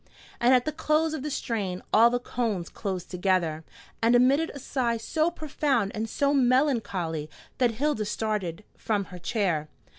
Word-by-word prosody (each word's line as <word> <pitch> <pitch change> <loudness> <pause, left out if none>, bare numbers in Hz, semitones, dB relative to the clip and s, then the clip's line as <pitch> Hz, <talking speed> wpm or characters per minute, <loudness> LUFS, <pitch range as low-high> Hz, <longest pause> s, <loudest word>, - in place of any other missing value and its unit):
And 240 +1 +4
at 250 - +2
the 310 - 0
close 310 0 +1
of 310 - -3
the 300 - -3
strain 205 -9 -3
all 230 +2 +7
the 245 - +1
cones 225 -7 -2
closed 190 -4 -5
together, 180 -4 0 0.4
and 230 +2 +4
emitted 275 +6 +4
a - - -5
sigh 250 -3 -1
so 315 +8 0
profound 285 - -1
and 220 +1 -3
so 280 +5 +1
melancholy 235 - +1 0.3
that 245 -3 +3
Hilda 270 -4 0
started 210 -4 -2
from 205 -3 -1
her 180 - -7
chair. 170 -7 -1
230 Hz, 160 wpm, -27 LUFS, 190-275 Hz, 0.4 s, all